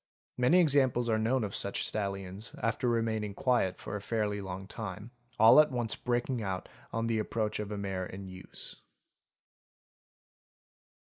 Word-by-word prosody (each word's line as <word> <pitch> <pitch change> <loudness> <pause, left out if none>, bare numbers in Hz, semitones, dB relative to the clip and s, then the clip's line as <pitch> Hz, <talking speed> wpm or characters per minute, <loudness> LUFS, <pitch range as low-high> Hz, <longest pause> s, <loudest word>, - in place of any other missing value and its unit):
Many 125 +9 +4
examples 135 -7 +3
are 110 -1 +2
known 115 +3 +1
of 100 -1 -3
such 100 - 0
stallions, 100 +1 -3
after 120 +3 0
remaining 110 -3 0
quiet 120 -8 +1
for - - -6
a 105 - -4
fairly 105 -1 -1
long 95 0 -6
time, 105 +1 -6 0.3
all 115 +6 +8
at 155 0 +6
once 120 -4 0
breaking 120 0 -1
out 95 -3 -3 0.2
on 115 0 -1
the 115 -1 +1
approach 110 0 -1
of 105 -1 -4
a 105 - -3
mare 95 -2 -3
in 95 +1 -8
use. 95 0 -8
110 Hz, 150 wpm, -31 LUFS, 100-120 Hz, 0.3 s, all